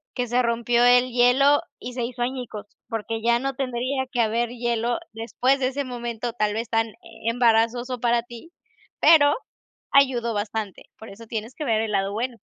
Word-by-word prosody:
que 245 -2 -1
se 245 +2 +2
rompió 235 0 +1
el 245 +1 +5
hielo 255 +5 +4 0.2
y 250 0 -7
se 245 -2 -3
hizo 240 0 -3
añicos, 240 -5 -5 0.2
porque 225 0 -3
ya 235 +1 +3
no 270 +1 -2
tendría 260 +1 -2
que 245 -3 +1
haber 230 +1 0
hielo 240 0 -1 0.2
después 240 +5 0
de 255 - +1
ese 280 +2 -2
momento, 240 -1 -4
tal 210 -3 0
vez 230 0 -3
tan 225 -1 0 0.3
embarazoso 240 +1 +2
para 235 0 +1
ti, 240 +8 -12 0.5
pero 290 -3 +6 0.6
ayudó 250 -4 +3
bastante, 210 -1 -4
por 220 - -11
eso 225 +3 -12
tienes 225 +2 -5
que 310 - -5
ver 220 -2 +1
el 220 - -2
lado 195 -1 0
bueno. 235 +2 -3
240 Hz, 175 wpm, -24 LUFS, 225-250 Hz, 0.6 s, pero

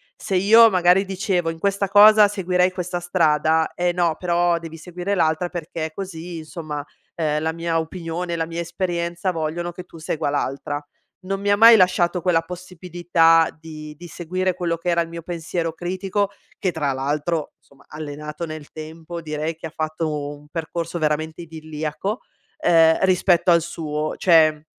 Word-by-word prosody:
Se 195 - -4
io 225 +5 +7
magari 185 0 +4
dicevo 190 -3 -1
in 165 - -5
questa 200 +3 0
cosa 210 +1 +8
seguirei 185 -2 +1
questa 180 -1 -4
strada: 160 -2 +1
"Eh 175 0 0
no 170 -2 0
però 175 -1 +1
devi 165 -1 -9
seguire 180 +4 -4
l'altra 160 +1 +1
perché 160 -2 -5
così 175 -3 -6
insomma, 155 -1 -7 0.4
uhm, 150 -2 0
la 160 +1 0
mia 165 0 -1
opinione, 170 +1 -4
la 165 -1 -1
mia 170 +1 -5
esperienza 170 +1 -2
vogliono 165 +1 -3
che 180 +1 -9
tu 170 - -14
segua 155 -1 -2
l'altra." 145 0 -2 0.5
Non 195 +1 -3
mi 200 - -1
ha 205 - +4
mai 230 +2 +9
lasciato 180 -2 +3
quella 170 -2 +2
possibilità 175 -1 +1
di 155 -1 -9
di 175 - -11
seguire 185 +2 -2
quello 170 -1 -2
che 175 +2 -3
era 170 0 +2
il 165 - -4
mio 170 0 -8
pensiero 165 -1 -3
critico, 190 +4 -2 0.3
che 185 - 0
tra 150 -4 -1
l'altro 150 +4 -2
insomma 140 0 -24
allenato 150 +1 -6
nel 155 -2 -8
tempo 160 +2 -8
direi 155 +1 -3
che 165 - -10
ha 160 - -6
fatto 155 -2 -3
un 145 0 -17
percorso 165 +1 -4
veramente 155 +1 -1
idilliaco, 160 +5 -5 0.4
uhm, 165 - +5
rispetto 180 -1 +3
al 170 - +5
suo. 155 -2 -4
Cioè 155 -3 +4
170 Hz, 165 wpm, -22 LUFS, 155-180 Hz, 0.5 s, mai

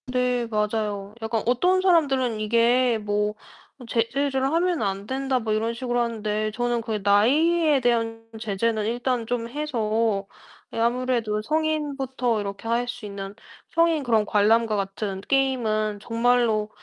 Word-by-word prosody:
네 250 -1 0
맞아요. 210 -2 -2
약간 225 0 -1
어떤 355 +11 +3
사람들은 270 - +2
이게 235 +2 +3
뭐 210 0 -1 0.4
어 250 - -12
"제재를 265 +4 0
하면 345 0 +1
안 195 0 -3
된다." 265 0 0
뭐 220 -2 -2
이런 225 +2 0
식으로 245 0 -2
하는데 215 -2 -2
저는 240 +1 -1
그 220 -2 -3
나이에 290 - +4
대한 230 -2 0
제재는 220 0 -1
일단 240 +1 -1
좀 235 0 -2
해서 225 -7 -1 0.5
이 - - -5
아무래도 235 -2 0
'성인부터 275 -5 -1
이렇게 200 +2 -6
할 235 +1 0
수 245 -2 -6
있는 200 -1 -7 0.4
성인 330 -2 +3
그런 225 -4 +2
관람과 215 +2 +3
같은 195 0 -3
게임은 220 -5 0
정말로 230 -1 +1
230 Hz, 285 characters per minute, -24 LUFS, 215-255 Hz, 0.5 s, 나이에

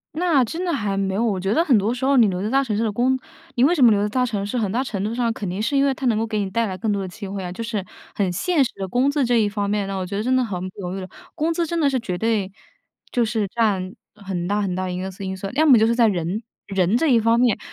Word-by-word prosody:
那 320 -5 +3
真 325 +10 -4
的 345 - 0
还 205 -8 -1
没 195 -1 0
有。 210 +4 0
我 210 -5 0
觉 195 +3 0
得 325 - +3
很 270 -9 +4
多 210 +3 +1
时 250 +1 -6
候 275 0 +3
你 230 -3 +6
留 185 -2 -2
在 210 - -2
大 270 +3 +3
城 225 -6 -2
市 220 - 0
的 220 - 0
工 250 +5 +1 0.4
你 245 - +3
为 305 +6 +5
什 285 - +3
么 235 - +8
留 205 -1 +2
在 210 - 0
大 250 +4 +1
城 210 -4 -2
市， 205 +5 -3
很 210 -5 0
大 245 +5 0
程 200 -7 -4
度 215 +2 -2
上 235 -1 0
肯 210 -3 -5
定 185 +4 -3
是 280 +6 0
因 275 - +4
为 275 - +2
它 265 - -6
能 225 -3 +2
够 225 - 0
给 215 -1 -2
你 200 -2 -2
带 230 +4 0
来 190 -3 -4
更 220 +1 -1
多 200 -1 -1
的 190 - -4
机 200 +2 -8
会 195 0 -5
啊， 180 - -5
就 190 +6 -5
是 220 -4 -3 0.3
很 195 -3 0
现 295 - +1
实 250 - -2
的 195 - -4
工 250 +8 +2
资 285 -1 +1
这 240 -1 +3
一 215 - +2
方 205 -1 -2
面。 205 -1 0
那 195 - -4
我 185 - -2
觉 200 +2 -4
得 210 - -1
真 255 +2 +2
的 255 - +3
很 200 -6 -4
不 185 - -16
犹 180 -1 -4
豫 - - -4
了， 185 - -6 0.3
工 320 +2 0
资 335 +1 0
真 335 +1 -2
的 290 -3 +3
是 265 -2 0
绝 185 -6 -4
对 215 -2 0 0.6
就 245 - +2
是 220 -2 -1
占 200 -4 0 0.2
很 190 -4 -4
大 205 +2 0
很 195 -3 -1
大 185 0 -2
一 180 0 -3
个 190 +1 -4
素 190 +1 -10
因 190 0 -4
素。 195 - -5
要 305 +4 +3
么 270 -6 +7
就 220 - +4
是 230 - +2
在 235 -2 +5
人， 185 +1 -1 0.2
人 195 +2 +1
这 325 - +1
一 245 -5 +5
方 230 +1 +3
面。 240 -4 +3
215 Hz, 360 characters per minute, -22 LUFS, 195-250 Hz, 0.6 s, 么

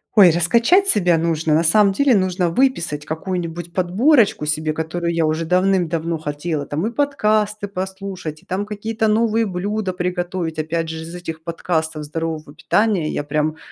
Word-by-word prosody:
ой, 195 -5 +8
раскачать 235 - +3
себя 180 - +3
нужно. 160 -1 0
На 160 +2 +3
самом 200 +5 +4
деле 270 +3 +3
нужно 185 -2 +1
выписать 170 - 0
какую-нибудь 170 +1 -4
подборочку 200 - +3
себе, 155 0 0
которую 170 +2 -2
я 165 -1 +1
уже 160 +1 -1
давным-давно 175 -2 +1
хотела. 150 0 -3
Там, 155 +9 -2
и - - -3
подкасты 215 -6 0
послушать, 190 -4 -6
и, - - -26
там, 190 +3 -2
какие-то 220 +1 -2
новые 225 +1 +2
блюда 195 +1 -2
приготовить, 180 -2 -3
опять 160 +1 -2
же, 160 0 -5
из 165 +1 -9
этих 160 -3 -7
подкастов 160 -2 -2
здорового 155 -1 -5
питания 200 -4 +1
я - - -2
прям, 155 +2 -1
175 Hz, 155 wpm, -20 LUFS, 160-205 Hz, -, ой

